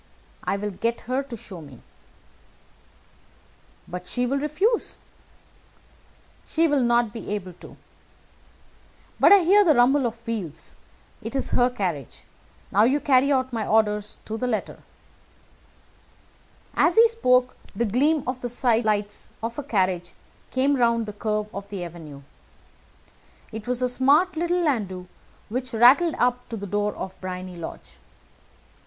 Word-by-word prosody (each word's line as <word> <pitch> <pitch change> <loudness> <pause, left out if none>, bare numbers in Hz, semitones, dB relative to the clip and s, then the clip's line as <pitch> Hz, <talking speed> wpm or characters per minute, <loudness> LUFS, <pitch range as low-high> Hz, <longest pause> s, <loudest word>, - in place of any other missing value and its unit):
"I 200 - -1
will 210 +1 -3
get 230 +5 -2
her 255 +3 -1
to 260 -4 -8
show 185 -5 -10
me." 140 -5 -14 2.0
"But 180 0 -7
she 245 +6 -1
will 275 +3 0
refuse." 365 - 0 1.5
"She 330 +1 +1
will 290 -3 +2
not 235 -2 +2
be 225 - -7
able 185 -3 -6
to. - - -13 1.4
But - - +6
I 400 -2 +8
hear 400 +5 +6
the 315 -6 +4
rumble 255 +2 +4
of 230 0 -8
wheels. 185 -9 -5 0.5
It 230 - -6
is 270 - -1
her 245 0 +3
carriage. 180 - -4 0.5
Now 210 +3 +5
carry 275 -1 +3
out 260 -2 0
my 225 -2 -2
orders 210 -1 +1
to 220 +1 -5
the 250 - -1
letter." 225 -3 -3 1.9
As 340 - +3
he 460 +1 +8
spoke, 255 - +2 0.2
the 235 - 0
gleam 280 +7 +2
of 255 0 -4
the 245 - -3
sidelights 220 -4 0
of 230 +4 -3
a - - -4
carriage 185 -7 -1 0.3
came 270 +2 +1
round 235 -2 +2
the 210 - -7
curve 210 0 -2
of 200 0 -7
the 195 -3 -5
avenue. 155 -5 -10 1.3
It 220 0 -8
was 250 0 0
a - - +3
smart 285 +9 +3
little 345 +2 0
landau 200 - -1 0.4
which 250 +2 -3
rattled 275 +9 +6
up 250 0 0
to 230 - -5
the 200 - -6
door 205 +1 -1
of 190 0 -7
Briony 185 -1 -6
Lodge. 165 - -9
235 Hz, 145 wpm, -24 LUFS, 205-270 Hz, 2.0 s, I